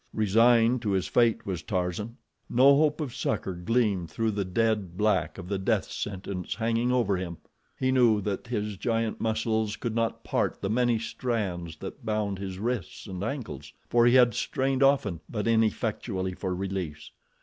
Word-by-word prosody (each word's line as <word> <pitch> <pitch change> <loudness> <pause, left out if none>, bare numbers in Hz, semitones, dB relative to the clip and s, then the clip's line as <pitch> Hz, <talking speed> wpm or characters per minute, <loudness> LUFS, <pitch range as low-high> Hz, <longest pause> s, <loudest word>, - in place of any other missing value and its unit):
Resigned 115 +3 +4
to 105 -4 -1
his 95 -1 +1
fate 115 +4 +2
was 90 -4 -3
Tarzan. 90 +7 -3 0.3
No 135 +3 +6
hope 150 +1 +2
of 135 -6 -4
succor 100 -3 -2
gleamed 95 -1 0
through 115 -1 -1
the 100 -1 -1
dead 100 -2 0
black 105 +1 +1
of 90 - -8
the 100 0 -2
death 95 - 0
sentence 95 -2 -4
hanging 115 +2 0
over 120 -6 +2
him. 85 -2 -5 0.4
He 130 0 +2
knew 120 -5 +4
that 100 +3 -3
his 105 -4 -3
giant 115 +1 -1
muscles 110 -1 0
could 120 -3 -4
not 115 0 -1
part - - -1
the 100 - -2
many 120 0 +2
strands 100 -8 -3
that 140 - -8
bound 105 -3 -1
his 95 -1 -5
wrists 115 -1 -3
and 95 0 -5
ankles, 130 +1 -5 0.2
for 120 0 +5
he 120 - +5
had 125 -2 +6
strained 135 +4 -1
often, 135 - +3
but 105 -1 -2
ineffectually 110 -4 0
for 90 0 -3
release. 90 -6 -4
110 Hz, 170 wpm, -27 LUFS, 95-120 Hz, 0.4 s, No